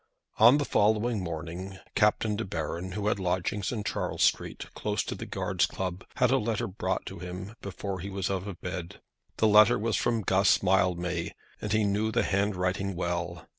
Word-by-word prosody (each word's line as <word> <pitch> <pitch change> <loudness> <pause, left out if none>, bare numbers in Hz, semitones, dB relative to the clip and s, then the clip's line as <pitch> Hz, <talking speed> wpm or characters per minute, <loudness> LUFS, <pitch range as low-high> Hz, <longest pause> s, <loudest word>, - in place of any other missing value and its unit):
On 120 +6 +8
the 145 - 0
following 110 -1 +2
morning 85 +3 -5 0.2
Captain 105 0 +2
De 115 - -2
Baron, 85 0 -4
who 105 0 -3
had 105 -1 +1
lodgings 95 +2 -1
in 110 -4 -3
Charles - - -1
Street - - +1
close - - -1
to - - -4
the - - -7
Guards' - - 0
Club, 95 -1 -4
had 125 - +3
a 135 - +4
letter 110 -2 -1
brought 95 +2 -2
to - - -7
him 90 +4 -7
before 100 -1 -5
he 95 +3 -5
was 95 0 -2
out 95 0 -2
of 95 -4 -7
bed. 90 -2 -5 0.4
The 110 - +4
letter 105 0 +7
was 110 +1 0
from 115 -2 0
Guss 95 +1 +3
Mildmay, 90 -2 +1 0.3
and 105 - -3
he 110 0 +3
knew 105 +2 +1
the 115 0 +2
handwriting 95 -1 0
well. 85 -1 -3
95 Hz, 185 wpm, -28 LUFS, 90-105 Hz, 0.4 s, On